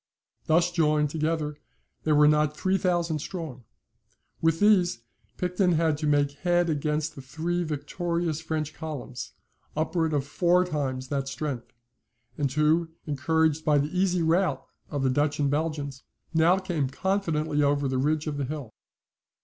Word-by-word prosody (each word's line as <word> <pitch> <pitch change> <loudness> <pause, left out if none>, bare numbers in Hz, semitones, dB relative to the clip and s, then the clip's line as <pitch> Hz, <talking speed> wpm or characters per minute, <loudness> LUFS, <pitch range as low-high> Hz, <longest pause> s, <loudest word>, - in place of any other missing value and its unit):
Thus 170 +2 +3
joined 150 -3 +2
together, 155 -1 -1 0.5
they 155 - +2
were 150 0 +6
not 150 0 +2
three 190 +2 +1
thousand 175 -4 0
strong. 150 - -6 0.8
With 165 0 +2
these 185 - +4 0.4
Picton 180 0 +1
had 160 -1 +2
to 155 - -1
make 145 -1 +3
head 175 0 +2
against 150 +1 -1
the 135 - -9
three 165 +6 -2
victorious 165 +1 -2
French 155 -2 -3
columns, 145 -6 -6 0.4
upwards 160 0 0
of 140 -2 0
four 175 +4 +3
times 135 -6 -3
that 140 -2 -1
strength, 135 -3 -4 0.6
and 140 -3 -1
who, 155 +3 +2 0.2
encouraged 155 +2 +1
by 150 -1 +3
the 145 +5 -1
easy 180 -2 +2
rout 165 -3 +1 0.2
of 145 -2 -2
the 130 - +3
Dutch 145 +2 +1
and 140 -1 +2
Belgians, 145 -3 -2 0.3
now 165 +3 +5
came 170 -8 -1
confidently 160 -3 0
over 145 -1 +2
the 130 -1 0
ridge 150 +3 +1
of 150 -2 -3
the 140 - -1
hill. 140 -5 -6
155 Hz, 150 wpm, -27 LUFS, 145-170 Hz, 0.8 s, were